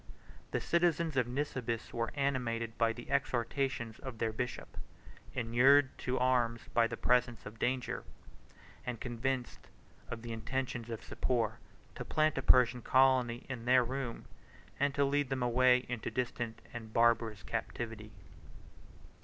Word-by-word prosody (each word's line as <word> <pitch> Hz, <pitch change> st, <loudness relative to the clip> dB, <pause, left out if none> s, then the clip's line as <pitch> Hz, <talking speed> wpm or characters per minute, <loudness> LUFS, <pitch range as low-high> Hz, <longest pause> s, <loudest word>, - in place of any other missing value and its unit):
The -, -, -1 dB
citizens 170 Hz, -2 st, +1 dB
of 125 Hz, -2 st, +2 dB
Nisibis 125 Hz, -3 st, -3 dB
were 115 Hz, 0 st, -1 dB
animated 120 Hz, -5 st, -1 dB
by 115 Hz, -1 st, +2 dB
the 120 Hz, +1 st, -9 dB
exhortations 120 Hz, -2 st, -1 dB
of 130 Hz, -4 st, -7 dB
their 110 Hz, 0 st, -1 dB
bishop, 125 Hz, +2 st, -4 dB, 0.6 s
65 -, -, -17 dB
inured 130 Hz, +4 st, +5 dB
to 130 Hz, 0 st, -1 dB
arms 120 Hz, -2 st, +2 dB
by 115 Hz, -1 st, +4 dB
the -, -, -5 dB
presence 125 Hz, -1 st, +1 dB
of 110 Hz, +1 st, -9 dB
danger, 125 Hz, 0 st, -1 dB, 0.8 s
and 125 Hz, -3 st, -4 dB
convinced 125 Hz, +1 st, -3 dB, 0.4 s
of 115 Hz, -1 st, -6 dB
the 115 Hz, -1 st, -5 dB
intentions 125 Hz, +1 st, -3 dB
of 115 Hz, -1 st, -5 dB
Sapor 115 Hz, -3 st, -1 dB, 0.3 s
to -, -, -6 dB
plant 155 Hz, -2 st, +1 dB
a -, -, -1 dB
Persian 125 Hz, -1 st, +5 dB
colony 130 Hz, -2 st, +3 dB
in 125 Hz, -3 st, -6 dB
their 125 Hz, 0 st, +5 dB
room, 125 Hz, -1 st, -4 dB, 0.5 s
and 140 Hz, 0 st, +1 dB
to 140 Hz, -, +3 dB
lead 140 Hz, -1 st, +1 dB
them 130 Hz, -2 st, -1 dB
away 125 Hz, +1 st, +4 dB
into 120 Hz, -3 st, -3 dB
distant 120 Hz, -1 st, -3 dB
and 115 Hz, -2 st, -7 dB
barbarous 115 Hz, -4 st, +2 dB
captivity. 110 Hz, +2 st, -4 dB
125 Hz, 145 wpm, -33 LUFS, 115-130 Hz, 0.8 s, inured